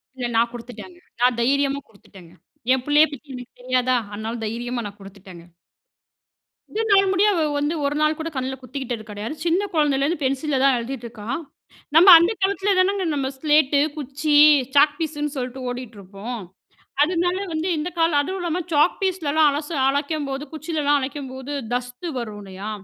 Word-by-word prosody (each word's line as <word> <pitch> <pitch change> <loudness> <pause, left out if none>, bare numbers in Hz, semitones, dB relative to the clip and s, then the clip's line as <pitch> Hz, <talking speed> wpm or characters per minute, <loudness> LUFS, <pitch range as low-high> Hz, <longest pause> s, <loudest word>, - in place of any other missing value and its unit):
இல்ல, 250 -2 -3
நா 225 - +5
குடுத்துட்டேங்க. 245 +9 -10 0.2
நா 245 - +6
தைரியமா 275 +3 +1
குடுத்துட்டேங்க. 190 -5 -17 0.4
என் 260 -1 -1
பிள்ளைய 295 +1 +5
பத்தி 285 -1 -10
எனக்கு 250 -1 -10
தெரியாதா? 255 0 +1 0.2
அதுனால 220 +3 -4
தைரியமா 240 +2 -3
நா - - -8
குடுத்துட்டேங்க. 190 -3 -13 1.3
இதுநாள் 400 -3 +3
முடிய 390 +2 +3
அவ 340 - 0 0.2
வந்து 295 +2 0
1 285 +1 0
நாள் 305 +1 +2
கூட 320 +1 -3
கண்ணுல 260 0 -2
குத்திக்கிட்டது 255 -3 -5
கெடையாது. 210 +7 -5
சின்ன 345 +3 +2
கொழந்தேலேருந்து 295 0 +1
பென்சில்ல 275 +2 0
தான் 275 -1 +5
எழுதிட்டுருக்கா. 235 -3 -7 0.7
நம்ப 350 +4 +8
அந்த 340 +4 +2
காலத்துல 395 +1 +1
தானங்க 385 +1 +2
நம்ப 270 -2 -1
ஸ்லேட்டு, 295 -1 +3 0.2
குச்சி, 290 +1 -1 0.4
சாக் 290 +1 +5
பீஸுனு 295 -2 -3
சொல்லிட்டு 255 0 -5
ஓடிட்டுருப்போம். 225 -2 -7 0.6
அதுனால 355 +3 +1
வந்து 320 +3 -2
இந்த 305 +3 -2
காலம் 330 -3 +3
அதுவும் 375 +6 -4
இல்லாம 345 0 -2
சாக் 300 +4 +3
பீஸ்லாம் 350 -6 -1
அலச 295 +2 -4 0.2
அழைக்கும்போது, 285 -1 -2
குச்சிலலாம் 305 -2 0
அழைக்கும்போது, 265 0 -6 0.2
டஸ்டு 245 +6 -4
வரும் 215 -4 -6
இல்லையா? 195 +2 -7
280 Hz, 145 wpm, -22 LUFS, 245-315 Hz, 1.3 s, நம்ப